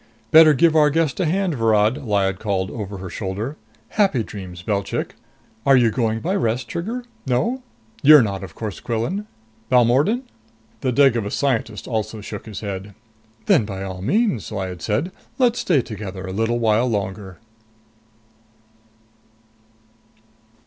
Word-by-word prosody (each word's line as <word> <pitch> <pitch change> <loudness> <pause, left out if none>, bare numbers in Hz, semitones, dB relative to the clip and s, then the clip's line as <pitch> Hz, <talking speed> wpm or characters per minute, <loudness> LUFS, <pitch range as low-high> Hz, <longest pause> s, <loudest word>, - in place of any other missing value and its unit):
"Better 155 -1 +8
give 165 +3 +4
our 150 -1 +5
guest 155 -3 0
a - - +2
hand, 185 +1 0
Virod," 115 +2 +2
Lyad 95 -2 +1
called 95 -3 -1
over 100 -3 -6
her 95 -1 -7
shoulder. 105 +8 -4 0.3
"Happy 190 - +2
dreams, 90 -4 -9
Belchik! 100 0 -2 0.5
Are 135 +1 +5
you 120 -3 +4
going 115 -2 -1
by 185 +4 -1
Rest, 120 - -1
Trigger? 225 +9 -4 0.2
No? 230 - 0 0.4
You're 150 -2 +8
not, 100 -2 -3
of 85 -4 -9
course, 110 -3 -5
Quillan. 145 - -3 0.4
Balmordan?" 130 - +3 0.6
The 130 - 0
Devagas 120 -6 +3
scientist 115 -6 -1
also 110 -1 -3
shook 105 - -8
his 105 - -7
head. 100 -1 -6 0.5
"Then - - +4
by 95 -2 -5
all 95 -1 -6
means," 195 - 0
Lyad 95 -4 -4
said, 115 - -1 0.3
"let's 245 -2 +2
stay 150 -9 +2
together 100 -4 -7
a 95 - -5
little 115 +3 0
while 115 +1 +2
longer." 95 -4 -3
115 Hz, 140 wpm, -21 LUFS, 100-145 Hz, 0.6 s, Better